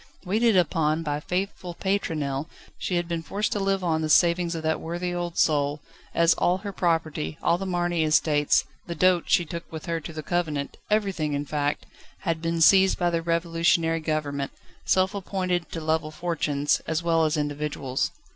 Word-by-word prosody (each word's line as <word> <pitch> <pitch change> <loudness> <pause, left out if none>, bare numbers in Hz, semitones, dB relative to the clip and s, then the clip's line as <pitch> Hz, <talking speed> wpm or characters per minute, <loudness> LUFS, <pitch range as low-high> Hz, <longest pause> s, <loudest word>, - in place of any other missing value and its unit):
Waited 215 +2 +3
upon 160 -2 +1
by 145 -2 -2
faithful 180 +1 -3
Pétronelle, 155 -8 -1 0.3
she 180 - -2
had 175 -1 0
been 170 -1 -2
forced 205 +6 -2
to 205 - 0
live 195 -1 0
on 160 -2 +1
the 155 - -2
savings 170 +1 +3
of 160 - -5
that 160 0 0
worthy 175 +2 -3
old 175 -1 -4
soul, 145 -1 +2 0.4
as 170 0 +5
all 180 +1 +1
her 200 +1 -6
property, 160 - -1
all 170 +1 +2
the 195 - -4
Marny 175 -2 0
estates, 155 -1 +3 0.2
the 170 - -4
dot 180 +1 +3
she 175 - +3
took 170 +1 -7
with 160 -1 -7
her 170 -1 -1
to 160 - -7
the 155 -1 -6
convent 155 -5 -2
everything, 195 -8 0
in 145 0 -2
fact 145 0 -1 0.4
had 165 -3 -1
been 165 0 -1
seized 190 +3 +6
by 175 -1 +1
the 165 -1 0
Revolutionary 165 0 +1
Government, 150 -3 -2 0.3
self 190 +1 +2
appointed 185 -3 -2
to 165 - -4
level 160 0 0
fortunes, 155 -3 0
as 160 +1 -1
well 165 -1 +3
as 155 0 +1
individuals. 145 -3 -2
165 Hz, 180 wpm, -25 LUFS, 155-175 Hz, 0.4 s, seized